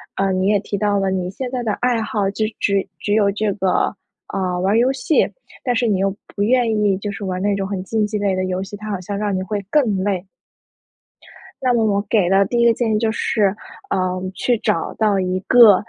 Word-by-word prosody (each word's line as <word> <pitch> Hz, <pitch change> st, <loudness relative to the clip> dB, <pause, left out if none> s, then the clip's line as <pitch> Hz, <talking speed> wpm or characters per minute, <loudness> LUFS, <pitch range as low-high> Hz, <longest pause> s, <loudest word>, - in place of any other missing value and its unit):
呃， 195 Hz, 0 st, +1 dB
你 185 Hz, +1 st, +1 dB
也 210 Hz, -, +4 dB
提 205 Hz, -, -4 dB
到 205 Hz, 0 st, +1 dB
了 195 Hz, -1 st, 0 dB
你 180 Hz, -1 st, -1 dB
现 250 Hz, +6 st, -5 dB
在 255 Hz, -2 st, -2 dB
的 215 Hz, -3 st, -1 dB
爱 245 Hz, -2 st, +2 dB
好， 210 Hz, -2 st, -1 dB
只 215 Hz, +2 st, -1 dB
只 200 Hz, -1 st, +1 dB
只 205 Hz, -, -1 dB
有 205 Hz, -2 st, +4 dB
这 210 Hz, 0 st, 0 dB
个， 190 Hz, 0 st, +1 dB, 0.4 s
呃， 185 Hz, -2 st, -1 dB
玩 190 Hz, -, +1 dB
儿 -, -, +5 dB
游 245 Hz, +3 st, +4 dB
戏， 280 Hz, +3 st, +2 dB, 0.3 s
但 245 Hz, -2 st, 0 dB
是 240 Hz, +1 st, +1 dB
你 200 Hz, -4 st, +1 dB
又 195 Hz, 0 st, 0 dB, 0.2 s
不 200 Hz, -, -4 dB
愿 235 Hz, +1 st, +3 dB
意 205 Hz, -3 st, +2 dB
就 205 Hz, 0 st, -4 dB
是 200 Hz, 0 st, -6 dB
玩 185 Hz, -1 st, -3 dB
那 205 Hz, 0 st, +1 dB
种 195 Hz, -1 st, -2 dB
很 195 Hz, -2 st, -3 dB
竞 215 Hz, +2 st, 0 dB
技 210 Hz, 0 st, -2 dB
类 200 Hz, -1 st, 0 dB
的 185 Hz, 0 st, -1 dB
游 185 Hz, 0 st, -2 dB
戏， 200 Hz, +1 st, -8 dB
它 215 Hz, +1 st, -7 dB
好 195 Hz, -3 st, -3 dB
像 200 Hz, +2 st, -4 dB
让 205 Hz, -2 st, -1 dB
你 185 Hz, -, -1 dB
会 205 Hz, +2 st, -2 dB
更 220 Hz, -10 st, +2 dB
累。 195 Hz, -2 st, -1 dB, 1.4 s
那 250 Hz, -1 st, +3 dB
么 225 Hz, -2 st, +2 dB
我 200 Hz, -1 st, +2 dB
给 205 Hz, -6 st, +3 dB
的 195 Hz, +2 st, +4 dB
第 240 Hz, +4 st, -1 dB
一 235 Hz, -, +4 dB
个 235 Hz, -, +6 dB
建 225 Hz, -2 st, 0 dB
议 -, -, +3 dB
就 225 Hz, -1 st, +1 dB
是， 205 Hz, -3 st, +1 dB, 0.4 s
呃， 195 Hz, -, +2 dB, 0.4 s
去 240 Hz, +4 st, +1 dB
找 165 Hz, -, -1 dB
到 210 Hz, -3 st, +2 dB
一 185 Hz, 0 st, -1 dB
个， 230 Hz, -2 st, +7 dB
205 Hz, 255 characters per minute, -20 LUFS, 195-220 Hz, 1.4 s, 个